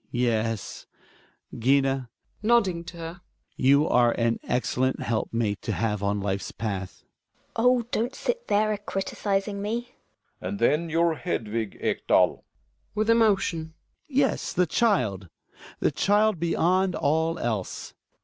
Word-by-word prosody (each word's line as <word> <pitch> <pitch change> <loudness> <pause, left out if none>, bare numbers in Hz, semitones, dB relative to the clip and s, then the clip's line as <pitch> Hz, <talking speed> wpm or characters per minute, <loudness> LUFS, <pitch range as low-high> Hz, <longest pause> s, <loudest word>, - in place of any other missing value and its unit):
Hjalmar. 120 - -5
Yes, 115 -3 -1 0.7
Gina 135 0 +2 0.3
(nodding 205 -6 +2
to 170 +1 -9
her), 165 +2 -7 0.3
you 140 +3 +4
are 120 -1 +4
an 115 -1 0
excellent 130 +1 0
helpmate 110 -2 -1
to - - -2
have 105 -3 -1
on 100 0 0
life's 100 0 -2
path. 100 -4 -5
Gina. - - -43 0.6
Oh 250 0 +5
I 235 - -13
don't 240 +4 -1
sit 485 0 -3
there 215 +1 +2
a 205 - -4
criticising 200 0 -2
me. 205 +1 -2 0.7
Relling. - - -4
And 205 - -3
then 165 -2 +2
your 165 +1 +2
Hedvig, 115 - -3
Ekdal. - - -2
Hjalmar - - +4 0.5
(with 215 +1 0
emotion). 195 -8 +2 0.3
Yes, 275 -1 0
the 180 - +3
child! 125 - +1 0.5
The - - +2
child 210 -1 +2
beyond 180 +2 +2
all 160 +3 +1
else. 110 -6 -3
160 Hz, 140 wpm, -26 LUFS, -, 0.7 s, Oh